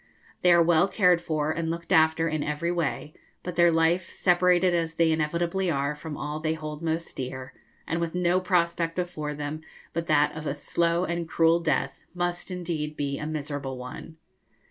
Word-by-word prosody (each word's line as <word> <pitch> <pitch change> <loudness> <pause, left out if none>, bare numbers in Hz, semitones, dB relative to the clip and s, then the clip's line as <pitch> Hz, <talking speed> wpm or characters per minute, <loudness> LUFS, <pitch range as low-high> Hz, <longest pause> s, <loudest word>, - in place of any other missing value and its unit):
They 180 - +5
are 170 -1 +6
well 170 +2 +4
cared 180 -4 +3
for 155 -2 -1
and 165 0 -2
looked 170 +2 -5
after 160 -1 +4
in 155 -2 -1
every 150 +4 -1
way; 155 -3 -2 0.3
but 180 - -4
their 170 0 +5
life, 165 +2 +2
separated 180 0 +3
as 165 -1 -1
they 165 -1 +3
inevitably 170 +4 0
are 140 -1 0
from 150 0 -7
all 150 +1 -4
they 160 0 -1
hold 155 -1 -6
most 165 0 -2
dear, 130 0 -6 0.3
and 165 +1 -2
with 170 0 -2
no 180 0 +2
prospect 170 -2 0
before 155 -5 -3
them 150 +2 -5 0.3
but 165 0 -3
that 150 -1 +3
of 155 -1 -5
a 140 - -1
slow 170 +3 0
and 170 -1 -3
cruel 165 +1 +4
death, 150 -4 -1
must 175 0 -2
indeed 165 -4 -4
be 140 -1 -2
a 150 - -4
miserable 145 -3 -4
one. 125 +5 -9
165 Hz, 185 wpm, -26 LUFS, 150-175 Hz, 0.3 s, are